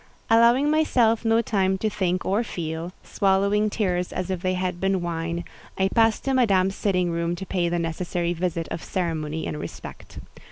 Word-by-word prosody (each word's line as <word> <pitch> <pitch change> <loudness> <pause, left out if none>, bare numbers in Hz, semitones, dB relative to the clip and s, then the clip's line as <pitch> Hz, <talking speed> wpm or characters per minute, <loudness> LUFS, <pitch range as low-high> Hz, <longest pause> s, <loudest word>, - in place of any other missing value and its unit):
Allowing 235 +6 +5
myself 245 -8 +3
no 225 0 +3
time 190 -3 +1
to 215 - -1
think 185 -3 -1
or 205 +5 +1
feel—swallowing 190 +4 -1
tears 180 -4 -1
as 185 +1 -3
if 185 -2 -3
they 185 0 0
had 180 -1 -2
been 190 0 +1
wine—I 170 +3 -3
passed 225 0 +2
to 270 - +1
Madame's 195 -7 +3
sitting 180 -4 0
room 170 +1 -1
to 190 - -7
pay 175 -2 0
the 175 - 0
necessary 170 +1 -2
visit 170 -1 -2
of - - -5
ceremony 160 -3 -2
and 150 - -4
respect. - - -9
185 Hz, 165 wpm, -24 LUFS, 170-210 Hz, -, Allowing